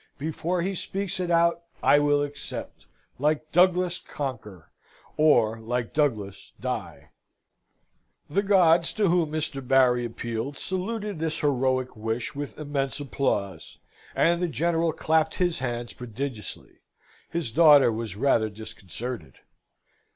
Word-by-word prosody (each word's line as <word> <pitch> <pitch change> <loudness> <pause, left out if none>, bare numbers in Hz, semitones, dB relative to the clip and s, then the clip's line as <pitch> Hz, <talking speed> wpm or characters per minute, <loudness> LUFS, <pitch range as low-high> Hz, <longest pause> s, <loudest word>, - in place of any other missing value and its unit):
Before 165 +4 -2
he 195 +2 -1
speaks 195 +1 -2
it 180 -1 -2
out, 170 0 +3 0.2
I 145 - +6
will 145 0 +2
accept, 145 0 -7 0.3
Like 155 +2 0
Douglas 180 0 +3
conquer, 110 - -7 0.4
or 120 -8 +3
like 120 +1 -3
Douglas 105 -10 -1
die!" - - -5 1.2
The 195 +7 +1
gods, 175 -4 +4
to 210 -4 +2
whom 170 -3 +2
Mr. 155 -3 -2
Barry 125 -2 +4
appealed, 120 +3 -4
saluted 205 0 -3
this 160 -1 -2
heroic 130 -2 0
wish 110 +2 -3
with 145 -1 -6
immense 140 -2 -2
applause, 100 - -2 0.4
and 170 +1 +3
the 180 - +1
General 165 +3 +1
clapped 160 0 +1
his 175 -2 0
hands 120 -2 -3
prodigiously. 125 -2 -7 0.5
His 165 -9 -2
daughter 145 -2 +7
was 110 -3 -4
rather 115 -2 +2
disconcerted. 110 - -7
145 Hz, 120 wpm, -26 LUFS, 120-170 Hz, 1.2 s, daughter